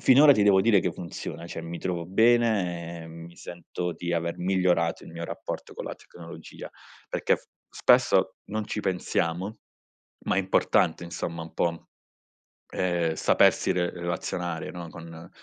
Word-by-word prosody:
finora 145 +3 +8
ti 105 -6 +2
devo 100 -2 +6
dire 105 -5 +5
che 90 - 0
funziona, 85 -1 -7
cioè 85 - -6
mi 85 +1 -6
trovo 85 -2 -3
bene, 95 -6 +2
ehm, 80 0 -10
mi 85 0 -13
sento 90 0 -5
di 85 0 -4
aver 85 0 -1
migliorato 90 -2 +1
il - - -11
mio 85 0 -6
rapporto - - -6
con - - -6
la - - -5
tecnologia 85 -1 -11 0.4
perché - - +1
f - - -20 0.2
spesso - - +3
non 110 0 -3
ci 105 - -3
pensiamo, 90 +1 -1 0.7
ma - - +1
è - - +4
importante, 95 -3 +2
insomma, 85 -1 -4
un 80 - -11
po', 85 -1 -1 0.8
ehm, 85 -3 0
sapersi - - +4
re 90 -1 0
relazionare, 85 -1 -3
no, 85 -1 -7
con 85 0 -10
85 Hz, 155 wpm, -27 LUFS, 85-95 Hz, 0.8 s, finora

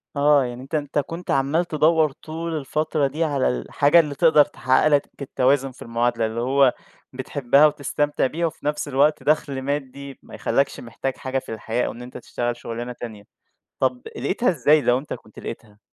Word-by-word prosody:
آه، 145 -1 +4
يعني 120 0 -6
أنت 135 +4 -6
أنت 145 -1 -1
كنت 165 +5 -5
عمّال 140 +6 +1
تدوّر 155 -1 +2
طول 160 +3 -5
الفترة 155 0 -1
دي 155 +5 -2
على 145 -4 +1
الحاجة 145 - +3
اللي 150 -3 0
تقدر 160 -3 +5
تحقق 130 0 +2
لك 145 -2 +2
التوازن 135 0 +1
في 125 - -19
المعادلة 115 0 0
اللي 110 +1 -3
هو 135 0 +3 0.4
بتحبها 140 +2 +3
وتستمتع 145 -1 -1
بيها 170 +5 -2
وفي 155 - -10
نفْس 150 0 -1
الوقت 145 +2 +2
دخل 145 -3 0
مادي 140 0 -5
ما - - -12
يخلاكش 140 0 0
محتاج 125 +3 -5
حاجة 130 0 -2
في 115 - -8
الحياة 115 +2 -2
أو - - -3
إن 120 - -11
أنت 125 +1 -9
تشتغل 120 0 -3
شغلانة 120 +1 -6
تانية، 110 -4 -8 0.6
طَب 130 -1 0
لاقيتها 185 - 0
إزاي، 150 -1 +4
لو 125 -2 +2
أنت 145 - -8
كنت 110 - -15
لاقيتها؟ 105 -3 -8
140 Hz, 180 wpm, -23 LUFS, 125-150 Hz, 0.6 s, تقدر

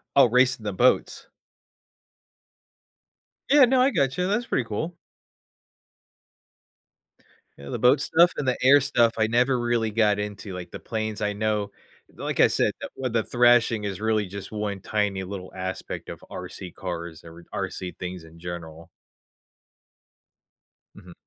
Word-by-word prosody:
Oh, 140 - +7
racing 125 0 +3
the 105 - -2
boats. 90 - +1 2.2
Yeah, 280 -1 +7
no, 255 +1 +3
I 265 - +5
gotcha, 140 - 0
that's 215 +5 0
pretty 130 - -1
cool. 160 +12 -4 2.6
Yeah, 70 0 -10
the - - -4
boat 130 +3 +5
stuff 170 +4 +4
and 140 - -2
the 125 - +1
air 140 +3 +7
stuff, 120 -4 +2
I 110 -1 +2
never 125 +3 +2
really 120 -2 0
got 105 -2 +2
into. 105 -1 -5
Like, 90 -1 -7
the - - -7
planes, 110 -1 -4
I 105 0 0
know 105 0 -1 0.4
like - - -4
I - - +7
said, - - +1
the - - -5
with 130 -3 -3
the 115 -1 +2
thrashing 120 -2 +3
is 100 -1 -4
really 110 -1 +1
just 95 0 -8
one 105 -2 -3
tiny 100 -3 -1
little 95 -1 -7
aspect 95 0 -5
of - - -9
RC 90 -2 -7
cars 85 -3 -6
or 85 +1 -13
RC 90 -1 -4
things 90 -1 -6
in 80 +1 -15
general. 85 -2 -8 2.1
Mhm. 90 -1 -13
110 Hz, 145 wpm, -25 LUFS, 95-125 Hz, 2.6 s, Oh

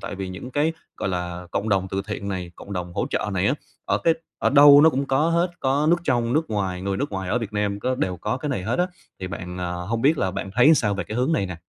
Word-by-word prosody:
tại - - -6
vì 95 -1 -5
những 95 +7 -7
cái, 150 +4 +1 0.2
gọi - - -2
là, 90 -1 -4
cộng 105 +4 -2
đồng 95 -2 +1
từ 95 0 -2
thiện 105 -1 -4
này, 90 -3 -4
cộng 100 - -10
đồng 90 -2 -4
hỗ - - -1
trợ - - -1
này - - +1
á, - - +3 0.3
ở - - +1
cái 165 - +5 0.2
ở - - +2
đâu 145 0 +9
nó 160 +2 +7
cũng 140 -1 -2
có 135 +4 +2
hết, 170 +2 +2
có 140 +3 +1
nước 175 - +5
trong 120 -4 +1
nước 155 0 0
ngoài, 95 -4 -2
người 100 0 -1
nước 140 +2 -2
ngoài 95 -1 -3
ở 120 - +1
Việt 115 -3 -5
Nam 105 -1 -1
có 130 +3 0
đều 95 -7 -2
có 125 - -2
cái 150 +2 -4
này 110 -9 -2
hết 115 - -1
á. 180 - +3 0.3
Thì 95 - -3
bạn, 90 -1 -6
à, 90 -1 -3
hông 95 +7 -3
biết 150 +2 +4
là 95 - +1
bạn 95 +1 -5
thấy 135 +7 +6
sao 105 -7 +1
về 100 -2 -3
cái 110 - -6
hướng 125 +6 +1
này 100 -11 +1
nè? 90 -2 -6
105 Hz, 290 wpm, -23 LUFS, 95-140 Hz, 0.3 s, đâu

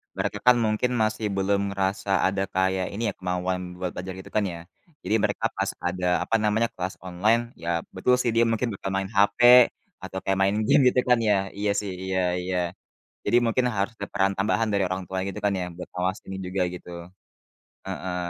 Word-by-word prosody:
mereka - - -2
kan 125 - +8
mungkin 110 +3 +1
masih 110 0 -1
belum 100 +1 +1 0.2
ngerasa 95 +1 -1 0.2
ada 95 +1 -1
kayak 95 0 +1
ini 110 - -3
ya, - - -16
kemauan 90 0 -1 0.2
buat 90 -1 -2
belajar 95 +1 -5
gitu 95 - -11
kan 105 - +3
ya. 85 -2 -6 0.4
Jadi 110 - +1
mereka 105 +2 0
pas 95 0 0 0.2
ada, 90 0 -2 0.2
apa - - 0
namanya 105 +2 +2
kelas 90 +1 -4
online, 100 +6 +2 0.2
ya 85 - -8 0.3
betul 125 +7 +3
sih 120 - +1
dia 115 +1 +5
mungkin 115 +2 0
bakal 95 -1 -5
main 95 0 -1
HP 100 -1 +2 0.6
atau 95 0 -5
kayak 95 0 0
main 100 +1 +3
game 145 +2 +5
gitu 125 - +3
kan 125 - +6
ya. 110 -2 +3 0.2
Iya 105 0 0
sih 100 -2 -4
iya 95 0 -1 0.2
iya. 90 0 -2 0.7
Jadi 120 - +3
mungkin 125 +2 +1
harus 100 0 -1
ada 100 - -6
peran 95 -1 +2
tambahan 105 +3 +1
dari 100 -1 +2
orang 95 +1 -3
tua 95 - -4
gitu 100 +1 -5
kan 100 - +2
ya 90 - -2
buat 90 - -8
awas 90 +2 0
ini 95 - -5
juga 90 +1 -2
gitu, 90 - -9 1.0
heeh. 90 -1 -4
95 Hz, 200 wpm, -25 LUFS, 95-110 Hz, 1.0 s, kan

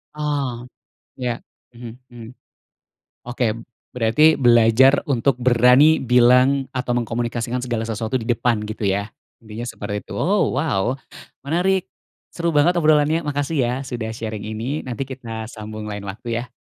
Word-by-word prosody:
Oh, 140 -5 -2 0.5
ya, 120 -2 -3 0.3
hmm 120 -1 -10 0.2
hmm, 115 -2 -10 1.0
oke. 125 0 -1 0.5
Berarti 125 +7 +4
belajar 120 +2 +4
untuk 135 -1 +1
berani 125 +5 +5
bilang 125 +2 +4
atau 125 -1 -1
mengkomunikasikan 120 +1 -2
segala 120 -3 -3
sesuatu 110 +2 -2
di 115 - -7
depan 115 -2 0
gitu, 105 -1 -2
ya? 100 +2 -2 0.2
Intinya 110 -1 -9
seperti 105 -1 -5
itu. - - -9
Ow, 195 -7 +1
wow, 130 -4 0 0.5
menarik. 180 +5 +1 0.5
Seru 170 -1 -1
banget 150 +4 +4
obrolannya, 155 +1 +3
makasih 145 +2 -2
ya 120 0 0
sudah 120 -3 -4
sharing 110 -2 -5
ini 115 +8 -3
nanti 125 +2 -3
kita 115 -4 -7
sambung 110 0 -8
lain 105 -1 -5
waktu 115 +4 -4
ya. 125 - -10
120 Hz, 135 wpm, -21 LUFS, 115-140 Hz, 1.0 s, berani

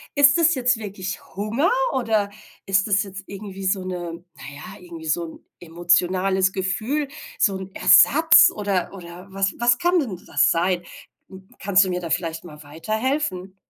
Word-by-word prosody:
ist 280 +1 +5
das 330 -1 +3
jetzt 250 0 +2
wirklich 195 -4 -7
Hunger 225 - 0 0.2
oder 220 -5 -1 0.3
ist 195 +1 +1
das 205 +1 +2
jetzt 195 -1 -9
irgendwie 195 -1 -9
so 190 0 0
'ne 175 -1 -6
na 155 - -18
ja, 145 - -11
irgendwie 170 -2 -11
so 160 +2 -1
'n 160 - -13 0.2
emotionales 180 +3 +1
Gefühl, 215 +11 -2 0.3
so 195 - +2
'n 190 0 -9
Ersatz, 320 +3 +6
oder 200 -3 -2
oder 180 0 -11
was 195 0 -1
was 240 +1 +3
kann 350 0 +1
denn 220 - -4
das - - +2
sein? 175 +1 0 0.5
Hm, 190 0 -14
kannst 195 0 +3
du - - -4
mir 180 0 -3
da 170 - -6
vielleicht 165 0 -2
mal 150 -4 -13
weiterhelfen? 195 - -4
190 Hz, 165 wpm, -22 LUFS, 180-215 Hz, 0.5 s, Ersatz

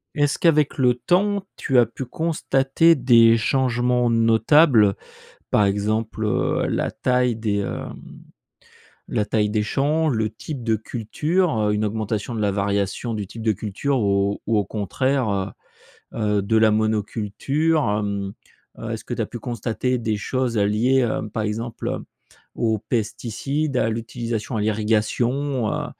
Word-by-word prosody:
Est-ce 145 -1 +1
qu'avec 155 -4 +3
le 125 -2 +4
temps, 195 +10 +1
tu 135 - 0
as 120 - +6
pu 115 +4 -7
constater 160 +1 +2
des 115 -4 +5
changements 125 0 +1
notables, 115 0 +4 0.5
par 105 - +3
exemple, 110 +2 -1
heu, 105 - 0
la - - -1
taille 125 -2 +1
des, 110 -2 -1
heu, 100 - -3 1.3
la 105 - -1
taille 105 -1 +1
des 105 0 +1
champs, 150 +8 +1
le 110 -5 0
type 130 +3 -7
de 115 -1 +1
culture, 150 - -1
heu, 105 -1 +1
une 105 +1 0
augmentation 110 +2 -3
de 115 - -3
la 105 - +2
variation 100 +3 -1
du 105 -3 -4
type 110 +3 -9
de 110 - +3
culture 110 +7 -2
ou 100 -1 +1
ou 115 0 +2
au 105 - +1
contraire, 125 +5 -1
heu, 95 -1 -4 0.7
heu, - - 0
de 110 +3 +1
la 110 0 +5
monoculture? 110 +8 0
Hem, 100 -1 -2 0.4
heu, - - -6
est-ce - - -5
que - - -3
tu - - -2
as - - -2
pu - - -8
constater 120 +1 -2
des 110 -2 -1
choses 125 +1 -1
à 100 - +3
liées, 120 +6 +2
heu, 110 -2 -1
par 110 -1 -2
exemple, 115 +2 -4
heu, - - -4 0.5
aux 110 -1 +1
pesticides, 125 +7 -2
à 110 - +2
l'utilisation 115 0 -4
à - - 0
l'irrigation, 115 +5 0
heu, - - -2
115 Hz, 155 wpm, -22 LUFS, 105-130 Hz, 1.3 s, as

